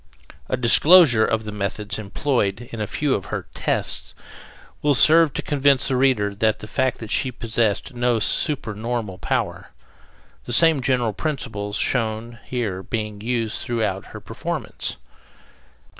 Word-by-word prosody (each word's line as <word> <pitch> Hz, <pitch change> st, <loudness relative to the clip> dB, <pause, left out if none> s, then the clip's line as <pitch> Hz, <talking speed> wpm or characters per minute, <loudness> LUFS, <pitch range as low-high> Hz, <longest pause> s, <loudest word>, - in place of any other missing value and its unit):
A 130 Hz, -, 0 dB
disclosure 130 Hz, 0 st, +6 dB
of 110 Hz, -1 st, -1 dB
the 105 Hz, -, -6 dB
methods 105 Hz, +2 st, -4 dB
employed 110 Hz, +1 st, -2 dB
in 115 Hz, -, -6 dB
a 105 Hz, -, -2 dB
few 145 Hz, +4 st, -1 dB
of 95 Hz, -, -2 dB
her -, -, -5 dB
"tests" -, -, -2 dB, 0.7 s
will 145 Hz, -1 st, +3 dB
serve 160 Hz, +3 st, +6 dB
to -, -, -3 dB
convince 140 Hz, -2 st, +2 dB
the 135 Hz, -, 0 dB
reader 125 Hz, -6 st, +2 dB
of 100 Hz, 0 st, -13 dB, 0.2 s
the 105 Hz, -, -10 dB
fact 130 Hz, +3 st, 0 dB
that 110 Hz, -2 st, -8 dB
she 130 Hz, -, 0 dB
possessed 115 Hz, +1 st, -1 dB
no 120 Hz, -1 st, +1 dB
supernormal 110 Hz, -, -2 dB
power, -, -, -2 dB, 0.8 s
the 120 Hz, -, 0 dB
same 160 Hz, 0 st, +5 dB
general 125 Hz, -4 st, 0 dB
principles 110 Hz, -7 st, -4 dB
shown 115 Hz, 0 st, -1 dB
here 110 Hz, -7 st, -3 dB
being 105 Hz, 0 st, -5 dB
used 115 Hz, -1 st, -2 dB
throughout 115 Hz, -3 st, -2 dB
her -, -, -10 dB
performance. -, -, -5 dB
120 Hz, 145 wpm, -22 LUFS, 105-130 Hz, 0.8 s, disclosure